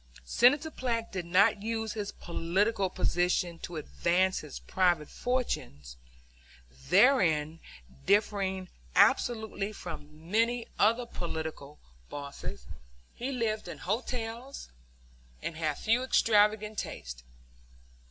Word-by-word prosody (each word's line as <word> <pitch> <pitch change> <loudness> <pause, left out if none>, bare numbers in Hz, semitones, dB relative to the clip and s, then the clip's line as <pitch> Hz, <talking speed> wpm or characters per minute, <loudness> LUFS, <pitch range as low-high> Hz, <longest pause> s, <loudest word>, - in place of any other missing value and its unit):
Senator 285 - +4
Platt 235 -5 -2
did 180 -3 -4
not 200 +4 +4
use 225 0 -2
his 205 -2 -4
political 190 +4 0
position 175 -1 0
to 175 - -7
advance 180 +4 +1
his 150 -3 -8
private 175 -5 +1
fortunes 70 - -3 0.9
therein 170 - +4 0.5
differing 195 -2 +1 0.3
absolutely 220 -3 +3
from 155 -3 -9
many 230 +2 +2
other 230 +3 +3
political 160 -7 -5 0.3
bosses. 140 - -7 0.5
He 255 +3 -4
lived 220 -5 -1
in - - -7
hotels 235 +4 -4 0.7
and 165 - -3
had 155 -2 -1
few 230 +3 +2
extravagant 210 -4 +3
tastes. - - -6
200 Hz, 100 wpm, -30 LUFS, 165-230 Hz, 0.9 s, Senator